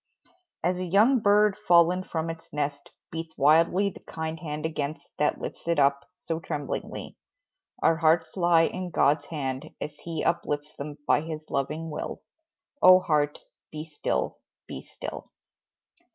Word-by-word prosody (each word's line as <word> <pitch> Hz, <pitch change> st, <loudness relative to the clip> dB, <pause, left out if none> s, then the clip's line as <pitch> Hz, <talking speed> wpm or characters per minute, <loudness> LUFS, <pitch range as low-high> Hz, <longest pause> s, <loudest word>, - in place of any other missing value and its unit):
As 180 Hz, +2 st, +1 dB
a -, -, -2 dB
young 210 Hz, +9 st, +4 dB
bird 210 Hz, -1 st, +4 dB
fallen 180 Hz, -2 st, +4 dB
from 165 Hz, -2 st, -3 dB
its 165 Hz, 0 st, -12 dB
nest 145 Hz, -1 st, -3 dB, 0.2 s
Beats 165 Hz, 0 st, -6 dB
wildly 165 Hz, +7 st, +4 dB
the -, -, -12 dB
kind 160 Hz, 0 st, -5 dB
hand 150 Hz, -1 st, -4 dB
against 155 Hz, -1 st, -3 dB
That 150 Hz, -, +1 dB
lifts -, -, -7 dB
it 170 Hz, -, +2 dB
up, 140 Hz, +2 st, +2 dB
so 165 Hz, -2 st, -4 dB
tremblingly 150 Hz, -3 st, -5 dB, 0.7 s
Our 165 Hz, -, +4 dB
hearts 160 Hz, 0 st, +2 dB
lie 175 Hz, -3 st, +4 dB
in 185 Hz, +2 st, -2 dB
God's 145 Hz, -2 st, +2 dB
hand, 140 Hz, -1 st, -4 dB
as 150 Hz, 0 st, -6 dB
He 165 Hz, -2 st, -4 dB
Uplifts 145 Hz, -3 st, -1 dB
them 145 Hz, +1 st, -7 dB
by -, -, +3 dB
His 155 Hz, -1 st, -6 dB
loving 150 Hz, +4 st, -2 dB
will, 150 Hz, -, -5 dB, 0.6 s
Oh, 185 Hz, 0 st, +9 dB
heart, 150 Hz, -5 st, 0 dB, 0.3 s
be 155 Hz, 0 st, -6 dB
still 155 Hz, -2 st, -2 dB, 0.3 s
be -, -, -6 dB
still! -, -, -8 dB
160 Hz, 150 wpm, -27 LUFS, 150-175 Hz, 0.7 s, Oh